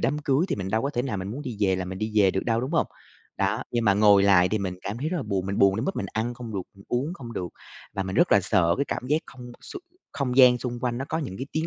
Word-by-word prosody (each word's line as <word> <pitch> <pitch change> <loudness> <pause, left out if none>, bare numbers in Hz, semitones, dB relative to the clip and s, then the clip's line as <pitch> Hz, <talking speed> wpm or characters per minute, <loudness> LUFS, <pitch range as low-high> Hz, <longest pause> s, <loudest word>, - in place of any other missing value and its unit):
đám 145 +2 0
cưới 145 +1 +1
thì - - -1
mình 95 -2 -4
đâu 110 +2 +1
có 140 - -1
thể 120 -4 -1
nào 130 -5 -3
mình 95 +1 -4
muốn 135 +7 -6
đi 125 -6 -6
về 95 -2 +2
là 95 - -3
mình 95 +1 -6
đi 110 +1 -3
về 100 -3 +5
được 95 - -2
đâu, 115 -1 +1
đúng 130 +3 -3
hông? 165 - +2 0.5
Đó, 100 +3 0
nhưng 120 -1 0
mà 100 - +4
ngồi 100 -1 +6
lại 95 -2 +5
thì 110 - 0
mình 95 -2 -3
cảm 105 +4 -4
thấy 150 - -2
rất 180 - -2
là 155 - -2
buồn, 100 -5 -2
mình 100 0 -2
buồn 100 0 +4
đến 115 - -2
mức 195 - -2
mình 100 - -2
ăn 115 +3 -2
không 120 -3 -8
được, 95 - -2
mình 100 0 -17
uống 135 +8 -1
không 120 -10 -9
được, 90 -5 -4 0.5
và 100 - -1
mình 95 +1 -4
rất 175 - +4
là 100 - +6
sợ 85 -2 +2
cái 140 - +2
cảm 125 - -3
giác 150 - +2
không 125 -1 -11
xung 380 - -9 0.3
không 125 -3 -2
gian 125 -2 +7
xung 120 -1 -4
quanh 120 -1 -1
nó 135 - -3
có - - -1
những 130 - -5
cái 130 - -4
tiếng 160 +1 -1
115 Hz, 325 wpm, -25 LUFS, 100-130 Hz, 0.5 s, gian